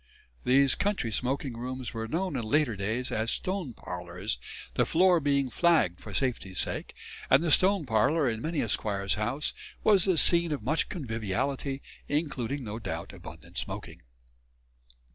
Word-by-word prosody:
These 135 +1 +5
country 200 - -1
smoking 130 +2 -1
rooms 125 +1 -5
were 115 -1 -4
known 170 +5 -2
in 125 - -1
later 120 +1 +1
days 110 +6 -2
as 110 +1 0
stone 185 - -2
parlours, 90 - -4 0.3
the - - +2
floor 180 +1 +4
being 140 -3 +1
flagged 160 - +3
for - - -10
safety's 120 -8 -2
sake; - - -1 0.3
and - - +5
the 165 - +1
"stone 185 +2 +4
parlour" 130 +6 +2
in 110 -2 -2
many 160 +2 -1
a - - -1
squire's 100 -2 0
house 120 +8 0 0.3
was 200 -4 +5
the 185 -3 +2
scene 170 0 +6
of 145 -7 -3
much 155 +7 0
conviviality, 135 - -3 0.2
including, 145 -3 -2
no 110 0 -5
doubt, 90 -6 -5
abundant 80 -4 -8
smoking. - - -6
130 Hz, 155 wpm, -29 LUFS, 110-155 Hz, 0.3 s, scene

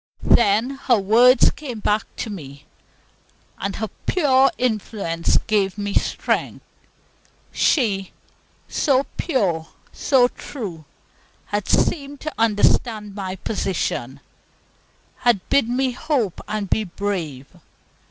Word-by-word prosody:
Then 225 +3 +3 0.2
her 245 -3 +5
words 235 +6 +5
came 255 -7 -7
back 210 +1 +1
to 220 - -5
me, 145 -6 -9 0.9
and 195 0 -3
her 220 0 -3 0.2
pure 270 -6 +4
influence 210 -8 0
gave 205 -3 +1
me 205 -1 -3
strength. - - -1 0.9
She, 200 - +1 0.6
so 275 -1 +2
pure, 190 - 0 0.2
so 260 -3 +3
true, 190 - -8 0.7
had 205 -1 -1
seemed 285 -2 0
to 310 - -4
understand 215 -1 +2
my 190 -2 -4
position, 180 - -3 1.0
had 235 -6 +1
bid 275 -5 +3
me 255 +1 +1
hope 250 - -1
and 210 -1 -3
be 215 - +1
brave. 175 -8 -4
215 Hz, 105 wpm, -22 LUFS, 195-255 Hz, 1.0 s, her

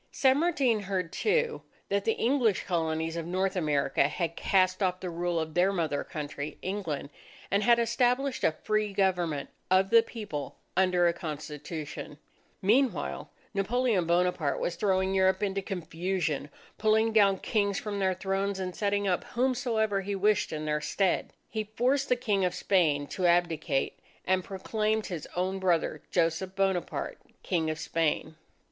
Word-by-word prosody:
San 265 +1 +3
Martin 280 -9 +2
heard, 185 -4 -3
too, 470 +1 +1 0.3
that 200 0 0
the 225 - +3
English 235 -5 +2
Colonies 160 -2 -1
of 165 -1 -4
North 190 +2 0
America 145 -5 +2
had 165 +1 -3
cast 185 0 +2
off 185 -1 +1
the 185 -2 -5
rule 170 0 -1
of 160 -1 -4
their 180 +3 +3
mother 160 -6 -1
country, 145 -1 -6
England, 180 -7 -3 0.4
and 200 - +3
had 235 +2 +5
established 245 +3 +1
a - - +4
free 215 +5 -1
government 180 -7 0 0.2
of 190 +1 +3
the 230 0 +8
People 210 - -6 0.2
under 180 -1 +3
a 170 - +2
Constitution. 150 -1 -6 0.5
Meanwhile, 245 +7 +1 0.2
Napoleon 210 -2 +1
Bonaparte 170 -5 +1
was 175 - -2
throwing 190 -1 +1
Europe 190 +1 +3
into 195 -1 0
confusion, 175 -5 -2 0.3
pulling 220 +1 +3
down 200 -3 +5
Kings 200 -1 0
from 205 -2 -4
their 190 -1 +1
thrones, 195 +1 -1
and 185 -1 -4
setting 205 -1 0
up 180 -2 +1
whomsoever 235 -5 0
he 200 +1 -3
wished 205 +1 +2
in 155 -1 -4
their 150 0 0
stead. 190 +3 0 0.2
He 215 -1 -3
forced 265 +4 +2
the 250 - +4
King 210 -6 0
of 180 - 0
Spain 155 -7 +2
to 185 -2 0
abdicate, 170 -5 +1 0.3
and 185 0 +2
proclaimed 215 +3 -1
his 170 -6 -5
own 185 +2 -1
brother 180 -3 +1
Joseph 175 +2 0
Bonaparte, 190 -2 -1 0.2
King 165 -4 0
of 155 - -2
Spain. 160 0 -1
190 Hz, 155 wpm, -29 LUFS, 170-210 Hz, 0.5 s, the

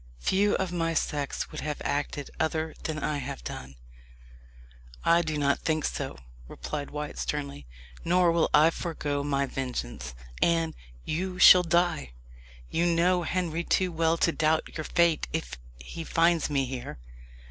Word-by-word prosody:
"Few 200 - +2
of 190 -2 -1
my 165 -1 -1
sex 145 -3 -2
would - - -6
have 150 0 -3
acted 145 -1 -2
other 160 0 -1
than 155 -1 -2
I 150 -1 -1
have - - -6
done." 65 +2 -7 1.3
"I 170 +1 +5
do 155 -2 -2
not 140 -1 +2
think 155 -1 0
so," 135 - -3 0.3
replied 65 - -5
Wyat 150 0 -5
sternly; 140 - -4 0.4
"nor 175 0 +4
will 165 -1 +2
I 155 +2 +6
forego 150 -5 -3
my 140 -1 0
vengeance. 65 - -5 0.3
Anne, 165 -1 +2 0.3
you 180 +3 -2
shall 180 0 +9
die. 170 - +1 0.6
You 170 +1 +2
know 175 +2 +3
Henry 170 -1 -1
too 185 +1 +1
well 165 0 +1
to 170 - +2
doubt 160 -1 0
your 155 - -4
fate 170 -2 +2
if 155 - -4 0.2
he - - -7
finds 165 0 +2
me 140 -2 +1
here." 125 -1 -6
160 Hz, 150 wpm, -28 LUFS, 140-170 Hz, 1.3 s, shall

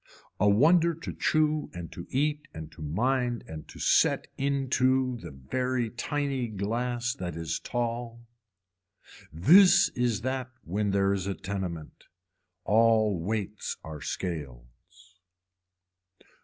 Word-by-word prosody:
A 105 - +4
wonder 165 - +4
to 165 - -7
chew 155 -1 +1
and 85 -3 -7
to 85 - -9
eat 150 +2 -1
and 80 -1 -8
to - - -13
mind 120 - 0
and 80 -1 -8
to - - -13
set - - +3
into 130 -2 +1
the 85 -7 -9
very 120 - -2
tiny 135 0 -2
glass 120 +4 -2
that 90 - -5
is 80 -1 -3
tall. 120 -1 -4 1.1
This 175 - +6
is 120 -4 -1
that 130 +1 -2
when 100 +5 -1
there 100 0 +2
is 95 -1 -2
a 100 - -2
tenement. 90 -5 -6 0.6
All 110 -2 +3
weights 105 +2 -3
are 80 -2 -8
scales. 85 +4 -7
110 Hz, 120 wpm, -28 LUFS, 90-130 Hz, 1.1 s, This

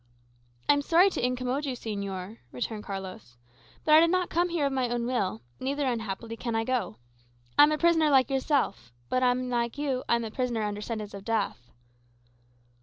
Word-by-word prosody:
"I - - +7
am 285 - +1
sorry 345 +6 +4
to - - -3
incommode 250 +3 -1
you, 275 -3 -2
señor," 200 -3 -5
returned 210 - -4
Carlos. 190 - -7 0.5
"But 305 - +4
I 310 - +10
did 335 +1 +5
not 365 0 0
come 350 +2 +2
here 335 -4 0
of 275 - 0
my 255 -2 0
own 240 0 -1
will; 195 - -1 0.2
neither, 280 +2 -1
unhappily, 230 -2 -3
can 230 0 -3
I 225 - +1
go. 225 - -2 0.6
I - - +7
am 295 +1 +7
a 305 - +1
prisoner, 325 -2 +4
like 265 -2 +4
yourself; 265 - 0 0.2
but, 255 - +1
unlike 245 -1 0
you, 275 -3 -1
I - - +5
am 235 - -1
a 220 - -5
prisoner 240 -2 -1
under 210 0 -3
sentence 215 -2 -5
of 200 -1 -8
death." 200 - -2
245 Hz, 190 wpm, -28 LUFS, 210-280 Hz, 0.6 s, I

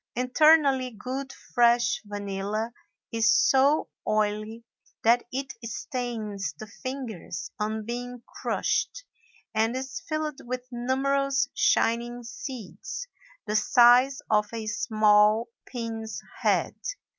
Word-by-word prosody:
Internally 270 +1 +4
good 255 +4 -5
fresh 240 -2 +2
vanilla 205 +2 -3 0.4
is 225 -1 +3
so 275 +3 +4 0.2
oily 215 +2 0 0.4
that 235 +2 +5
it 270 0 -3
stains 220 - -4
the 215 - -7
fingers 225 -7 -6
on 215 0 -2
being 245 +1 -5
crushed - - -1 0.5
and 220 +2 +1
is 265 0 -4
filled 310 -2 -2
with 250 +1 -4
numerous 270 +1 +1
shining 240 +1 +1
seeds 265 - -7 0.4
the 210 - -2
size 250 +5 +5
of 210 0 +2
a 225 -1 -5
small 215 +1 +3 0.2
pin's 225 -3 -4 0.2
head. - - +2
240 Hz, 100 wpm, -27 LUFS, 215-260 Hz, 0.5 s, that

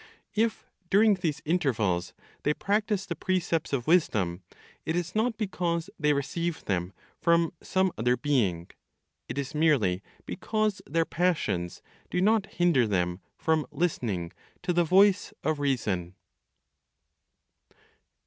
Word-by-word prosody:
If, 225 +1 0 0.2
during 210 +2 +5
these 175 -6 -2
intervals, 110 - 0 0.3
they 150 +1 +1
practice 210 -1 0
the 175 -3 -4
precepts 170 -2 -1
of 130 -4 -1
wisdom, 100 - +2 0.4
it 160 - -2
is 175 0 -2
not 220 +1 +1
because 180 -4 -2
they 150 -1 +3
receive 160 +4 -2
them 90 -2 -1 0.3
from 170 +1 +3
some 190 0 +1
other 125 +2 +2
being, 105 -11 0 0.6
it - - -5
is 140 +1 -3
merely 140 - +2 0.2
because 215 -1 -1
their 165 +3 +1
passions 160 - -1 0.3
do 180 - -1
not 210 +2 +3
hinder 170 -9 +2
them 90 -3 0 0.2
from 160 -2 +1
listening 120 - -1 0.3
to 180 - 0
the 175 0 +3
voice 190 +3 +4
of 155 0 0
reason. 100 -11 -1
160 Hz, 125 wpm, -28 LUFS, 115-185 Hz, 0.6 s, during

